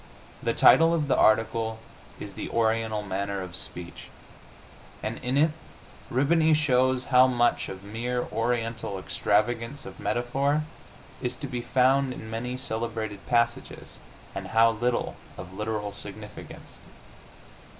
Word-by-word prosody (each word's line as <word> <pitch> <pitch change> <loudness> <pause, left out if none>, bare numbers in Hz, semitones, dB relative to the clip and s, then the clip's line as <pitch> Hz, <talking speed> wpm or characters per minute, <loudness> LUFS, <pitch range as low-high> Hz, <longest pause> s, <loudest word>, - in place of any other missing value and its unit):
The - - 0
title 165 +1 +6
of 150 -3 -1
the 135 - +3
article 110 0 +2 0.4
is - - -7
"The - - -6
Oriental 110 -2 0
Manner 100 0 -3
of 90 -1 -8
Speech," 90 -1 -7 1.0
and - - -3
in 125 +2 -1
it 155 +2 +4 0.6
Rihbany 155 +5 +4
shows 130 -4 +2
how 125 +1 +8
much 120 -2 +1
of 95 0 -8
mere 120 +4 -2
Oriental 115 -3 -1
extravagance 115 +7 0
of - - -10
metaphor 140 +5 0 0.6
is 125 -1 -2
to 140 - -7
be 125 -3 -4
found 130 +2 +3
in 110 -2 -9
many 125 +3 -3
celebrated 110 -4 -4
passages, 120 0 -1 0.3
and 95 -1 -5
how 115 +3 +5
little 120 +2 -1 0.2
of 90 0 -9
literal 105 0 -3
significance. 105 +1 -10
115 Hz, 130 wpm, -27 LUFS, 110-130 Hz, 1.0 s, how